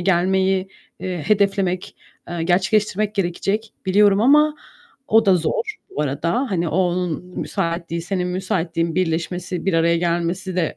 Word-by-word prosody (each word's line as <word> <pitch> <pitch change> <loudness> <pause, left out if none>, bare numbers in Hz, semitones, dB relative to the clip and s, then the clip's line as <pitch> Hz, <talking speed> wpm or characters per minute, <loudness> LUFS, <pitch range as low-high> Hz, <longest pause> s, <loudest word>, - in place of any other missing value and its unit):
gelmeyi, 190 +1 +2 0.3
eee, 180 -3 -4
hedeflemek, 195 -3 +1 0.3
eee, 170 -1 -3
gerçekleştirmek 200 +3 +1
gerekecek 195 +3 -1
biliyorum 200 +1 +4
ama, 300 +4 +5 0.5
o 225 0 +4
da 190 - +6
zor, 435 - -2
bu 150 - -2
arada, 170 - -1
hani, 175 -3 0
o 160 - -2
onun 180 -2 0
müsaitliği, 170 0 -2
senin 180 0 -2
müsaitliğin 170 -3 -1
birleşmesi, 180 +1 -2
bir 195 - +2
araya 170 +1 +3
gelmesi 175 +2 -1
de 165 -4 0
185 Hz, 135 wpm, -21 LUFS, 170-195 Hz, 0.5 s, da